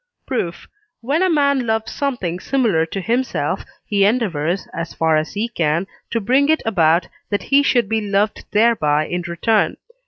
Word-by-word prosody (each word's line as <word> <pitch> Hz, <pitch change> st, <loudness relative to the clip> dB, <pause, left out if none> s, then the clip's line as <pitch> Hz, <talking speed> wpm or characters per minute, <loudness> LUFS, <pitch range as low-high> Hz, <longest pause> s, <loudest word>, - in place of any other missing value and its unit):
Proof. 180 Hz, -10 st, -3 dB, 0.3 s
When 280 Hz, +8 st, 0 dB
a 375 Hz, -, +3 dB
man 280 Hz, -6 st, +2 dB
loves 220 Hz, 0 st, -1 dB
something 235 Hz, -12 st, -2 dB
similar 215 Hz, -11 st, +1 dB
to 195 Hz, +4 st, -4 dB
himself, 240 Hz, +6 st, -1 dB, 0.2 s
he 200 Hz, -1 st, +1 dB
endeavours, 195 Hz, -6 st, 0 dB
as 165 Hz, 0 st, -5 dB
far 160 Hz, -1 st, +2 dB
as 155 Hz, +1 st, -1 dB
he 215 Hz, +3 st, -1 dB
can, 165 Hz, -5 st, 0 dB, 0.2 s
to 230 Hz, -, 0 dB
bring 260 Hz, +7 st, +2 dB
it 315 Hz, -, +2 dB
about 170 Hz, -5 st, +3 dB, 0.2 s
that 205 Hz, -, -1 dB
he 280 Hz, +1 st, +4 dB
should 245 Hz, -6 st, +2 dB
be 220 Hz, +1 st, 0 dB
loved 205 Hz, +1 st, 0 dB
thereby 180 Hz, -10 st, +2 dB
in 175 Hz, 0 st, -3 dB
return 205 Hz, +6 st, +1 dB
(III. -, -, -17 dB
210 Hz, 175 wpm, -20 LUFS, 170-245 Hz, 0.3 s, he